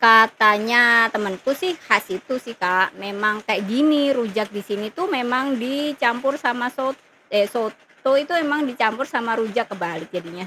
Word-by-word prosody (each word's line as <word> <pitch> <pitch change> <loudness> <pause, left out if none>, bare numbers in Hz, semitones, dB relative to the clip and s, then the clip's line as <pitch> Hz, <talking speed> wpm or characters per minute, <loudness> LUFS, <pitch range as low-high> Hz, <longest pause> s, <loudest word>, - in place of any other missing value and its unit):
Katanya 225 +1 +6
temanku 205 +1 -3
sih 365 -1 -2
khas - - +1
situ 370 -10 -5
sih, 235 -2 -12
Kak, 185 -1 +1
"Memang 210 +2 -2
kayak 205 -2 -2
gini, 285 +4 +2
rujak 220 -4 -2
di 205 - -6
sini 210 +2 -6
tuh 365 +3 -3
memang 255 0 -1
dicampur 275 0 -1
sama 245 -3 -1
sot" 265 0 -4 0.4
eh, 205 0 +2
"soto 235 +3 -4
itu 280 +3 +1
emang 300 -2 0
dicampur 245 0 -1
sama 230 -1 -1
rujak," 225 0 -2
kebalik, 170 -5 -7
jadinya. 175 +1 -8
235 Hz, 155 wpm, -21 LUFS, 210-270 Hz, 0.4 s, Katanya